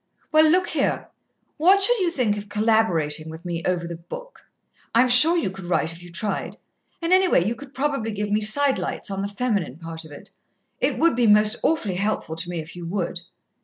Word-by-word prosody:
"Well, 310 0 +5
look 360 +3 +2
here: - - -1 0.5
what 380 +5 +5
should 485 +3 +5
you 365 -3 +1
think 250 -11 0
of 205 0 -8
collaborating 190 -8 +1
with 160 +2 -10
me 170 -1 -3
over 180 -2 0
the 170 -1 -6
book? - - -10 0.5
I'm 245 +2 +5
sure 305 +8 +6
you 255 - -1
could 190 -1 -10
write 170 -2 0
if 165 - -11
you 175 - -12
tried, 190 +3 -3 0.5
and 335 +2 +2
anyway, 370 - +4
you 225 - 0
could 270 +3 -13
probably 275 -5 -1
give 210 0 -3
me 210 +1 +2
sidelights 265 0 0
on 195 0 -3
the 200 - -2
feminine 200 - -2
part 165 -1 -7
of 155 - -13
it. 145 - -12 0.5
It - - 0
would 335 -4 +3
be 240 -1 +2
most 210 +2 +4
awfully 215 - 0
helpful 195 -5 -2
to 170 +2 -4
me 175 - -4
if 160 +2 -7
you 175 - -8
would." 180 -1 -3
210 Hz, 205 wpm, -23 LUFS, 175-280 Hz, 0.5 s, sure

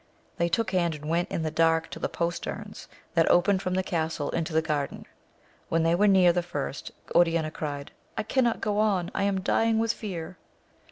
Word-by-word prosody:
They 170 -1 +1
took 190 +3 0
hand, 170 -4 +1
and 150 0 -10
went 170 +3 0
in 165 - -2
the 155 - -1
dark 165 0 +2
to - - -7
the - - -2
posterns 170 0 -4 0.3
that - - +3
opened 185 +2 +4
from 185 -1 -2
the 185 - +1
castle 160 -4 -2
into 165 0 -2
the 160 - +3
garden. 150 -3 -2 0.6
When 165 0 +2
they 165 +1 +3
were 205 +4 +4
near 185 -3 +6
the 175 - +1
first, 145 -5 -5 0.2
Oriana 165 -2 +3
cried, 145 -3 -5 0.3
I - - 0
cannot 240 +1 +1
go 210 -1 0
on, 195 -5 +1
I - - -1
am 195 -1 0
dying 225 +3 +2
with 225 0 +1
fear 180 -4 -6
170 Hz, 200 wpm, -27 LUFS, 160-195 Hz, 0.6 s, near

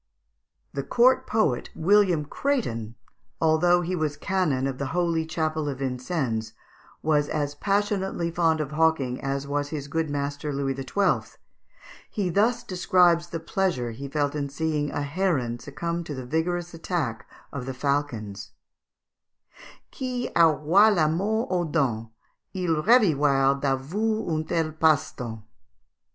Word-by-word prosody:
The 140 - -2
court 255 - +3
poet, 215 - +1
William 180 -3 +3
Crétin, 120 - -2 0.4
although 170 +2 +4
he 180 +2 -2
was 155 -3 -2
Canon 175 -9 0
of 135 -1 -3
the 140 - -2
holy 165 -2 +1
chapel 155 -2 -1
of 135 - -4
Vincennes, 125 -4 -2 0.5
was 150 -2 +2
as 145 -1 -1
passionately 195 0 -1
fond 165 -2 +2
of 145 -2 -4
hawking 150 -5 +1
as 135 0 -1 0.3
his 145 -2 -5
good 160 +2 -1
master 145 +1 -3
Louis 135 -1 -1
XII. 135 +9 -1 0.7
He 200 -4 -2
thus 220 +7 +2
describes 175 -2 +3
the 170 -1 -5
pleasure 165 -8 -1
he 140 +5 -7
felt 145 0 -1
in 145 -2 -3
seeing 150 0 -1
a 145 0 -3
heron 145 -7 -1
succumb 170 +5 -4
to 150 - -5
the 130 -1 -6
vigorous 175 +5 -1
attack 165 -8 -3 0.2
of 135 -3 -5
the 130 - -3
falcons: 115 -8 -2 1.4
"Qui 250 -2 -3
auroit 170 +6 +5
la 155 -4 +3
mort 215 +9 0
aux 175 -2 +1
dents, 120 -8 0 0.5
Il 180 -3 +1
revivroit 145 - +4
d'avour 175 +12 -1
un 155 0 0
tel 160 -1 0
passe 155 -1 +2
temps!" 110 -4 -7
155 Hz, 135 wpm, -25 LUFS, 140-175 Hz, 1.4 s, auroit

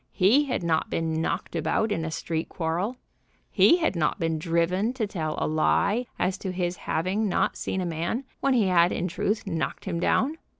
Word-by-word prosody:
He 220 +10 +4
had 255 -9 -2
not 160 -2 +1
been 160 -1 -1
knocked - - -3
about 220 -1 0
in 165 -5 -1
a 160 - -2
street 160 0 -3
quarrel. 180 +9 -2 0.5
He 340 - +6
had 325 - 0
not 155 -3 0
been 165 -1 0
driven 175 +7 +1
to 250 -4 -1
tell 160 -6 -3
a - - 0
lie 200 +9 +1
as 185 +2 -1
to 190 - -3
his 180 -1 -2
having 190 +6 -1
not - - +1
seen 190 - -3
a - - -2
man 170 - -2 0.2
when 275 -1 +2
he 225 -4 +3
had, 175 -2 +4
in 180 - -1
truth, 200 +5 -1
knocked 165 -5 -3
him 175 -3 -2
down. 285 - +1
180 Hz, 200 wpm, -26 LUFS, 165-215 Hz, 0.5 s, He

